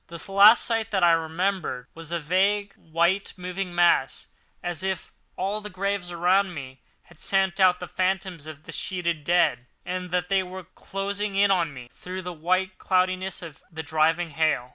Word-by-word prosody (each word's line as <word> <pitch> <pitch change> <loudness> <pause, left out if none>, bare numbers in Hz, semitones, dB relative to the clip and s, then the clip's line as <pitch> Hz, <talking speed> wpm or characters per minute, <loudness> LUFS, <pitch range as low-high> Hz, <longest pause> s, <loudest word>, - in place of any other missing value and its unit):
The 170 +3 -8
last 205 +4 +8
sight 225 -2 0
that 195 -4 0
I 170 - +7
remembered 165 -4 -1
was 165 0 -9
a 170 - 0
vague, 195 +6 +1
white, 170 +5 0
moving 180 0 -5
mass, 170 -7 +2 0.3
as 175 -3 -2
if 190 -1 -3 0.3
all 200 +3 -1
the 210 - -5
graves 195 -1 -2
around 180 +2 +2
me 130 -2 -8 0.2
had 175 -2 -20
sent 195 -1 +1
out 185 -2 +5
the 180 - -6
phantoms 185 -3 -2
of 155 -1 -9
their - - -9
sheeted 170 -5 -2
dead, 155 -8 +2 0.2
and 180 0 -4
that 180 0 0
they 195 0 +2
were 185 0 -7
closing 195 +3 -4
in 200 0 +4
on 170 -5 +2
me 125 -3 -10
through 185 +1 -7
the 180 0 -5
white 185 +4 -1
cloudiness 185 0 0
of 160 -4 -10
the 160 0 -6
driving 160 +2 +1
hail. 150 -5 +1
180 Hz, 180 wpm, -25 LUFS, 165-190 Hz, 0.3 s, last